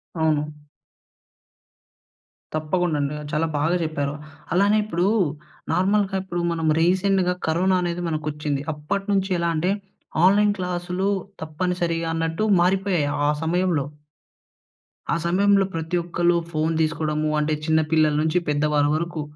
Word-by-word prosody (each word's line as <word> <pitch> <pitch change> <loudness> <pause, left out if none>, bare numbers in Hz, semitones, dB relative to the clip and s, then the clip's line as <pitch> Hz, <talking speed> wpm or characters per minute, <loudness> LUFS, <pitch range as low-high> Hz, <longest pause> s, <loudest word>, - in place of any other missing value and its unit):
అవును. 150 -2 0 2.0
తప్పకుండ 160 +2 0
అండి. 140 +1 -1 0.2
చాలా 155 +2 +1
బాగా 160 +4 +1
చెప్పారు. 145 -3 -2 0.4
అలానే 200 +4 +4
ఇప్పుడు 180 -3 0 0.7
నార్మల్‌గా 195 +1 +1
ఇప్పుడు 175 -2 -3
మనం 165 -1 -1
రీసెంట్‌గా 185 +1 +2
కరోనా 185 +4 +2
అనేది 175 0 -2
మనకొచ్చింది. 150 -2 -2
అప్పటి 175 +7 -3
నుంచి 195 -1 +1
ఎలా 170 0 +1
అంటే, 175 +4 +1 0.5
ఆన్‌లైన్ 205 +2 +4
క్లాస్‌లు 180 +1 -2 0.3
తప్పనిసరిగా 170 +1 -2
అన్నట్టు 165 +4 -1 0.2
మారిపోయాయి 185 -4 +1 0.2
ఆ - - +4
సమయంలో. 170 -3 +1 1.3
ఆ - - +2
సమయంలో 195 +3 +3
ప్రతి 165 +1 -3
ఒక్కళ్ళు 175 0 +1
ఫోన్ 160 0 0
తీసుకోవడము. 155 -1 0
అంటే, 150 +1 0
చిన్న 160 0 +3
పిల్లల 155 -1 +4
నుంచి 160 +2 +1
పెద్ద 145 0 +1
వారి 145 -1 +3
వరకు. 165 0 -3
170 Hz, 120 wpm, -23 LUFS, 155-185 Hz, 2.0 s, అలానే